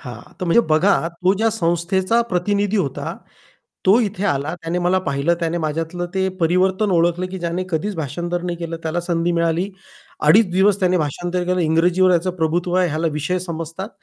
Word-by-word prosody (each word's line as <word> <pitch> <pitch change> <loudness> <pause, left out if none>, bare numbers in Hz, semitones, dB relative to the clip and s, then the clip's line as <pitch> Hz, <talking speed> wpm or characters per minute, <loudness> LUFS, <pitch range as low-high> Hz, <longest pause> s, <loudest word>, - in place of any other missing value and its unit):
हां, 120 -3 -8 0.2
तर - - -1
म्हणजे 175 +7 +4
बघा, 165 +2 +3
तो 180 +2 0
ज्या 225 +2 +2
संस्थेचा 185 +3 +1
प्रतिनिधी 205 +3 0
होता 140 -9 -2 0.7
तो 205 +6 +6
इथे 205 -2 -3
आला, 145 0 -1
त्याने 175 +1 -3
मला 180 +2 +2
पाहिलं 140 0 0
त्याने 170 0 -1
माझ्यातलं 165 +2 -3
ते 190 0 +1
परिवर्तन 185 +4 +2
ओळखलं, 175 +1 +2
की 190 - -5
ज्याने 170 +2 -2
कधीच 190 +4 -2
भाषांतर 170 +4 -3
नाही 175 -1 -3
केलं, 165 -1 -5
त्याला 165 +2 -1
संधी 170 0 0
मिळाली. 170 +3 0 0.6
2.5 200 +4 +6
दिवस 195 +2 +3
त्याने 185 -1 +2
भाषांतर 175 +4 -2
केलं 180 0 0
इंग्रजीवर 175 +3 +3
याचं 175 +2 +1
प्रभुत्व 170 +2 0
आहे, 180 -1 +3
ह्याला 160 +2 -1
विषय 150 +5 -1
समजतात. 170 +2 -6
175 Hz, 175 wpm, -20 LUFS, 165-185 Hz, 0.7 s, तो